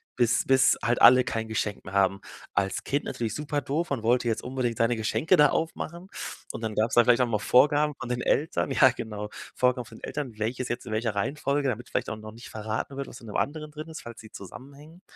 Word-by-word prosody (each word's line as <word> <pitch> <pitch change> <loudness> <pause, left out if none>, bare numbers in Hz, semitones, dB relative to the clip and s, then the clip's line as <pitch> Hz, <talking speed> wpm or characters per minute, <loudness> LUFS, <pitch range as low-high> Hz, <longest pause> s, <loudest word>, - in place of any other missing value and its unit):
bis 120 -1 +2
bis 130 0 +4
halt 120 0 +1
alle 125 0 +8
kein 110 -2 -3
Geschenk 105 -2 -2
mehr 95 - -8
haben. 100 0 +2 0.3
Als 95 0 0
Kind 140 +1 0
natürlich 115 -2 -3
super 150 -1 -2
doof, 150 +6 -2
man 130 -6 -2
wollte 120 +1 +2
jetzt 110 - -1
unbedingt 125 -3 -2
seine 115 +1 +2
Geschenke 150 - +2
da 150 -1 +6
aufmachen 170 +2 -3 0.5
und 115 - -6
dann 110 -1 -3
gab's 110 +2 +1
dann 120 - +7
vielleicht 125 +1 +5
auch 125 - +3
mal 110 -3 0
Vorgaben 145 +7 +4
von 130 - -5
den 125 0 -1
Eltern. 150 -2 0
Ja, 130 -1 +6
genau, 105 -3 -6 0.3
Vorgaben 125 -1 +2
von - - -13
den - - -18
Eltern, 130 -7 -5
welches 120 +4 -2
jetzt 120 +1 -3
in 110 - -5
welcher 110 0 0
Reihenfolge, 140 +6 0
damit 120 -1 -3
vielleicht - - -2
auch - - -3
noch 110 0 -9
nicht 115 +2 -12
verraten 110 +5 -4
wird, 140 0 -4
was 130 - -10
in 115 - -12
'nem 105 - -8
anderen 150 +1 -2
drin 155 +2 -8
ist, 160 - -8
falls 120 -1 -9
sie 110 - -14
zusammenhängen. 140 - -12
125 Hz, 235 wpm, -27 LUFS, 110-140 Hz, 0.5 s, alle